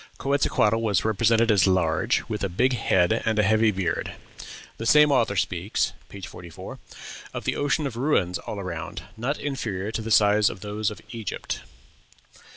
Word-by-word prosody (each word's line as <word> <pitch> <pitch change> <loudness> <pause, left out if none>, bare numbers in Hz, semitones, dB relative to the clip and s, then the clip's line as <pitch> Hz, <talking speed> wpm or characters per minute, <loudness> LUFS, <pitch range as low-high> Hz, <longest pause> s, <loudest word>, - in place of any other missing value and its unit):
Quetzalcoatl 125 -5 +1
was 105 -4 +1
represented 115 +1 +3
as 100 -5 +4
large, 85 -4 +1
"with 105 -3 -4
a 100 - 0
big 125 +9 +1
head 95 -6 +2
and 110 -1 0
a 105 - +4
heavy 110 +2 +3
beard." 95 -5 -2 0.6
The 115 - -4
same 150 +2 +6
author 115 -6 +2
speaks 90 +1 -1 0.2
(page 100 -3 -8
44) 85 +1 -10 0.6
of - - -4
"the - - -1
ocean 145 +1 0
of 135 -5 -4
ruins 115 - +1
all 105 - -6
around, 85 -5 -6
not 130 +6 -2
inferior 110 -9 -3
in 115 0 -3
size 105 -1 +4
to - - -1
those 105 +2 -3
of 105 - -10
Egypt." 115 -4 -5
105 Hz, 160 wpm, -25 LUFS, 95-115 Hz, 0.6 s, same